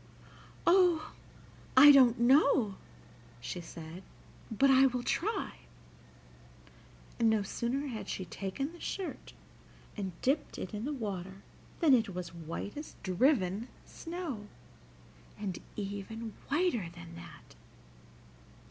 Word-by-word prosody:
"Oh! 355 -3 +4 0.6
I 290 +2 +11
don't 255 -4 +6
know," 255 -3 +4 0.7
she 175 +8 -5
said; 165 +1 -9 0.5
"but 270 +5 +4
I 270 0 +7
will 250 -1 -2
try." 400 - -2 1.6
And 230 - +4
no 220 -2 +2
sooner 240 +8 -2
had 235 -6 -5
she 185 - -3
taken 200 - -4
the 345 - -13
shirt 380 +1 -5 0.6
and 190 -5 -5
dipped 280 +3 0
it 185 - -6
in 210 +2 -4
the 295 - -2
water 195 -7 -5 0.4
than 310 -5 +6
it 220 -7 +2
was 180 -2 -5
white 170 +4 -6
as 295 +1 -8
driven 195 - +2 0.2
snow, 330 - -6 0.9
and 195 -4 -4 0.2
even 210 +2 -5 0.2
whiter 280 - +1
than 170 -1 -10
that. 170 -2 -12
225 Hz, 115 wpm, -32 LUFS, 190-280 Hz, 1.6 s, I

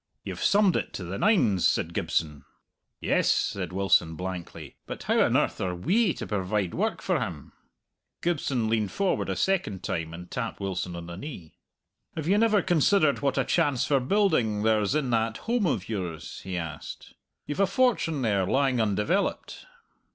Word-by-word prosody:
"You've - - -6
summed 200 -3 +4
it - - -2
to 95 - -5
the 90 +3 -5
nines," 120 - +3
said - - 0
Gibson. 75 -3 -1 0.6
"Yes," - - +2
said 90 -3 -1
Wilson 90 -3 +2
blankly, 90 0 -7
"but - - -6
how - - +2
on - - +3
earth - - 0
are 90 -1 -1
we 185 - +2
to - - -5
provide 100 -2 -1
work - - -1
for - - +1
him?" - - -5 0.7
Gibson 140 -9 0
leaned 110 -3 0
forward 195 -2 0
a - - -1
second 165 - 0
time 80 -1 -3
and 90 +1 -10
tapped 115 -3 -4
Wilson 95 -2 -3
on 85 0 -7
the 85 0 -8
knee. 95 - -8 0.6
"Have 155 -1 -4
you 200 +3 +4
never 215 -3 +3
considered 175 -2 +3
what 140 -1 0
a 135 - +2
chance 145 -7 +1
for 140 -2 +2
building 130 - +1
there's 110 +2 +2
in 140 -5 0
that 115 -1 +1
holm 230 -4 0
of 105 - -1
yours?" 90 -7 -5
he 95 -1 -4
asked. 80 -3 -7 0.3
"You've 145 - -5
a 195 - +4
fortune 195 - +1
there, 100 -5 +1
lying 135 -1 +2
undeveloped." 110 - -1
115 Hz, 175 wpm, -27 LUFS, -, 0.7 s, summed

